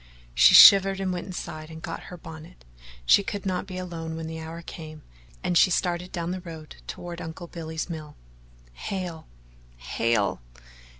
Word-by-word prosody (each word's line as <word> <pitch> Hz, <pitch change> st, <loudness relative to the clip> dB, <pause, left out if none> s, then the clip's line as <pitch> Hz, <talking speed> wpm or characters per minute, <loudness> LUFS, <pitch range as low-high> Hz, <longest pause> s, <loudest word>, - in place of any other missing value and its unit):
She -, -, +7 dB
shivered 195 Hz, -1 st, +9 dB
and 190 Hz, -1 st, -1 dB
went 175 Hz, +1 st, -5 dB
inside 160 Hz, -4 st, -7 dB
and 160 Hz, 0 st, -9 dB
got 165 Hz, 0 st, -7 dB
her 180 Hz, -, -9 dB
bonnet 165 Hz, +1 st, -12 dB, 0.4 s
she 200 Hz, -, +6 dB
could 200 Hz, -1 st, -5 dB
not 185 Hz, 0 st, -2 dB
be 185 Hz, -1 st, -7 dB
alone 165 Hz, -3 st, -5 dB
when 165 Hz, 0 st, -5 dB
the 160 Hz, 0 st, -6 dB
hour 165 Hz, +1 st, -8 dB
came, 155 Hz, -2 st, -10 dB, 0.4 s
and 175 Hz, -, 0 dB
she 175 Hz, -, +6 dB
started 175 Hz, 0 st, -1 dB
down 170 Hz, -1 st, -3 dB
the 185 Hz, 0 st, -4 dB
road 160 Hz, -3 st, -10 dB
toward 175 Hz, 0 st, -7 dB
Uncle 165 Hz, +1 st, -7 dB
Billy's 160 Hz, -2 st, -6 dB
mill. 155 Hz, -4 st, -8 dB, 0.6 s
Hale! 175 Hz, -, -5 dB, 0.5 s
Hale! 100 Hz, -, 0 dB
170 Hz, 165 wpm, -26 LUFS, 160-180 Hz, 0.6 s, shivered